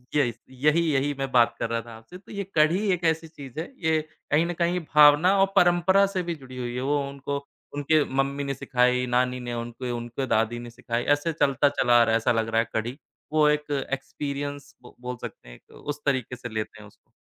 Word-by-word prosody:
य 145 - +5
इस 120 0 -6
यही 150 +6 +2
यही 140 +1 +1
मैं 135 -1 -2
बात 120 -1 +4
कर 115 - -1
रहा 115 0 -1
था 115 0 -11
आपसे, 115 +11 -13
तो 185 - -17
ये 200 -1 -3
कढ़ी 155 +5 +4
एक 175 -1 -3
ऐसी 160 0 +1
चीज़ 145 -2 -10
है, 165 - -2 0.2
ये 160 -1 +3 0.3
कहीं 155 +3 +4
न 175 - -2
कहीं 175 +1 +1
भावना 150 +6 +7
और 195 - +6
परंपरा 180 +2 +5
से 190 -2 -2
भी 170 -1 -3
जुड़ी 130 -3 -12
हुई 120 -1 -4
है। 125 - -2
वो 145 +2 +1
उनको 140 +1 -4 0.4
उनके 145 +1 +3
मम्मी 135 +1 -1
ने 140 0 -2
सिखाई, 125 0 +1
नानी 125 +1 +1
ने 120 -1 -5
उनके 120 +1 -5
उनके 120 +2 -4
दादी 115 +2 +1
ने 120 0 -8
सिखाई। 115 0 -3
ऐसे 165 +3 -3
चलता 140 -2 +2
चला 120 -3 +3
आ - - +7
रहा 115 - +1
है - - +5
ऐसा 115 - +1
लग 115 -1 0
रहा 115 0 +2
है 115 - -6
कढ़ी। 120 +4 -2 0.4
वो 155 -1 +5
एक 150 0 -1 0.2
एक्सपीरियंस 145 0 -5
ब 125 - -14
बोल 125 0 -4
सकते - - -9
हैं - - -11
एक - - -22
उस 145 0 -6
तरीक़े 130 -3 0
से 125 0 -8
लेते 110 0 -4
हैं 105 - -12
उसको। - - -25
135 Hz, 235 wpm, -25 LUFS, 120-150 Hz, 0.4 s, भावना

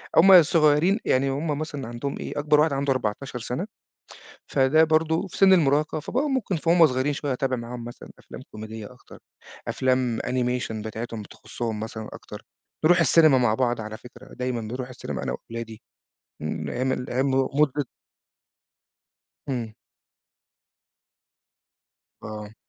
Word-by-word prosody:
هُم 185 0 +9
صغيّرين، 155 +5 +3
يعني 135 +1 +2
هُم 145 +2 -2
مثلًا 145 -5 -5
عندهم 120 +4 -4
إيه، - - -4
أكبر 150 0 +3
واحد 155 -1 +3
عنده 140 0 0
14 125 +2 -3
سَنة 125 - -4 0.8
فده 140 +3 +4
برضه 160 +3 +1
في 180 - -10
سِن 195 -1 +6
المراهقة، 155 -2 +2
فبقوا 265 - -1
ممكن 245 -9 -1
وهُمّ 170 0 +7
صغيّرين 130 +2 0
شوية 140 -1 -2
أتابع 130 0 -1
معاهم 120 0 -7
مثلًا 120 - -10
أفلام - - -11
كوميدية 110 0 -8
أكتر، 125 - -16 0.5
أفلام 130 -3 0
animation 125 -2 -1
بتاعتهم 110 0 -6
تخصّهم 110 +1 -6
مثلًا 110 0 -6
أكتر، - - -10 0.4
نروح 175 +2 +5
السينما 155 -2 +5
مع 120 -4 +3
بعض 120 -1 0
على 110 0 -7
فكرة، 125 +2 -14
دايمًا 125 -2 -3
نروح 125 +4 -5
السينما 125 - -6
أنا - - -2
وأولادي 115 - -8 0.6
إمم 75 0 -4
أيام 130 +2 -1
ال 125 - -3
أيام 130 +2 0
م 130 0 +1
مدة 145 -2 +1 1.6
إمم. 120 -4 -3 2.5
آه. 105 0 -7
130 Hz, 140 wpm, -25 LUFS, 115-155 Hz, 2.5 s, هُم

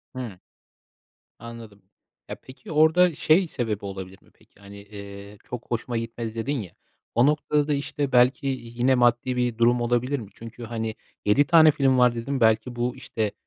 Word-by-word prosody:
Hı. 115 -8 -6 1.0
Anladım. 115 -4 -11 0.5
Ya, - - -4
peki, 130 +4 -12
orada 160 +3 +4
şey 165 +6 +3
sebebi 115 - -3
olabilir 95 -1 -8
mi, - - -25
peki, - - -27
hani, 100 0 -12
eee, 100 0 -11
"çok 125 -1 -8
hoşuma 120 +1 -2
gitmedi" 115 0 -5
dedin 135 +6 -2
ya, 90 -6 -9 0.4
o 120 +3 +4
noktada 150 0 +1
da, 150 - +2
işte, 140 -1 -3
belki 125 +2 +3
yine 125 -1 0
maddi 120 +1 +2
bir 120 -2 -1
durum 120 +1 +3
olabilir 120 +4 0
mi? 105 -5 -10
Çünkü, 115 +1 -10
hani, 110 -1 -4 0.3
7 105 +8 +4
tane 160 0 +7
film 135 -3 +2
var 125 -1 +4
dedin, 125 +3 -3
belki 110 +2 +2
bu, 120 +1 -2
işte, 110 -2 -3
120 Hz, 170 wpm, -24 LUFS, 110-135 Hz, 1.0 s, tane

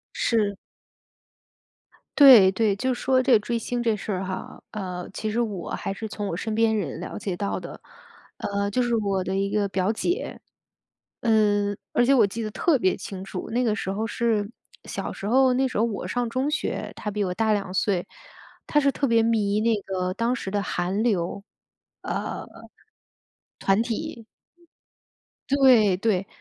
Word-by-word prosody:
是。 210 -4 +1 1.6
对 255 -10 +9
对， 215 0 +2
就 260 +4 0
说 255 +1 +2
这 255 -3 +5
追 235 +2 -2
星 240 +1 -3
这 230 -2 +2
事 210 - -7
儿 190 -2 -1
哈， 185 0 -6
呃， 180 -4 -5
其 215 - -3
实 225 +3 0
我 205 -6 -4
还 195 - -3
是 220 +3 -6
从 210 -1 -5
我 165 - -3
身 215 +3 -3
边 225 0 +3
人 195 -5 -3
了 - - -6
解 195 -3 -3
到 200 +2 -2
的。 - - -9 0.6
呃， 200 0 -2
就 250 - +1
是 240 -1 +1
我 200 -3 0
的 190 +1 -2
一 195 0 0
个 205 0 +1
表 190 +1 0
姐。 350 - -2 0.8
嗯， 205 -3 +2
而 245 - +3
且 275 - +4
我 240 -6 +6
记 205 +4 -5
得 215 - -3
特 295 +4 +2
别 185 -4 +2
清 190 0 -7
楚。 185 -1 -6
那 245 +2 +1
个 215 -2 +1
时 200 - -4
候 215 +3 -2
是 225 -3 0 0.4
小 - - -4
时 - - -8
候， 260 +3 +4
那 265 +1 +2
时 255 - -5
候 215 - +3
我 210 -6 -2
上 245 +4 -1
中 260 +4 -1
学， 300 - -2
她 210 - -4
比 210 +1 -2
我 180 - -2
大 220 +4 +1
2 200 -3 -1
岁。 190 -2 0 0.6
她 295 - +2
是 280 -1 +3
特 280 - -1
别 230 -1 +4
迷 215 -3 +1
那 230 0 +3
个 185 -1 -2
当 230 +3 0
时 195 - -5
的 205 +1 -1
韩 185 +4 -1
流， 195 -4 -1 0.6
呃， - - -4
团 - - -20 1.6
体。 240 -8 -9 1.2
对 255 -8 +5
对， 195 -2 0
215 Hz, 190 characters per minute, -25 LUFS, 195-235 Hz, 1.6 s, 对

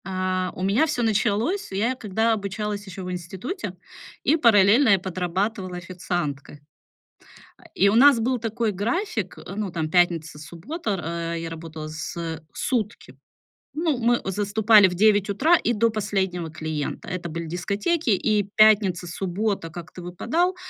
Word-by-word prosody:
А, 185 -1 -1
у 185 - -5
меня 205 +11 +3
всё 250 -5 -1
началось. 220 - 0
Я 220 +7 0
когда 220 0 0
обучалась 205 0 -4
ещё 190 0 -7
в 180 - -5
институте, 185 - -5 0.5
и 295 - +4
параллельно 230 -2 +5
я 195 -2 +5
подрабатывала 185 +1 -3
официанткой. 170 -5 -4 1.0
А, - - -21
и 200 - +4
у 205 - +1
нас 270 0 +7
был 250 +3 0
такой 225 -1 -1
график, 215 - -2
э, 195 - -9
ну, 205 -3 -3
там 160 -2 -2
пятница 165 -3 +1
суббота, 180 - -6
р 195 - -1 0.4
э, - - -4
я 165 - -5
работала 160 -1 -7
с 155 +2 -6
э, 165 -1 -4
сутки. 230 -4 -3 0.6
Ну 315 -3 0
мы 240 0 +2
заступали 205 +1 +5
в 180 - -3
9 205 +1 +3
утра, 290 - +4
и 240 - 0
до 230 +1 +2
последнего 195 -6 -2
клиента. 155 -1 -4
Это 180 -2 -4
были 165 +1 -5
дискотеки. 205 - -1
И 210 +1 +2
пятница, 205 -5 +4
суббота 190 +1 -2
как-то 175 +2 -9
выпадал, 320 - -1
200 Hz, 155 wpm, -24 LUFS, 175-225 Hz, 1.0 s, нас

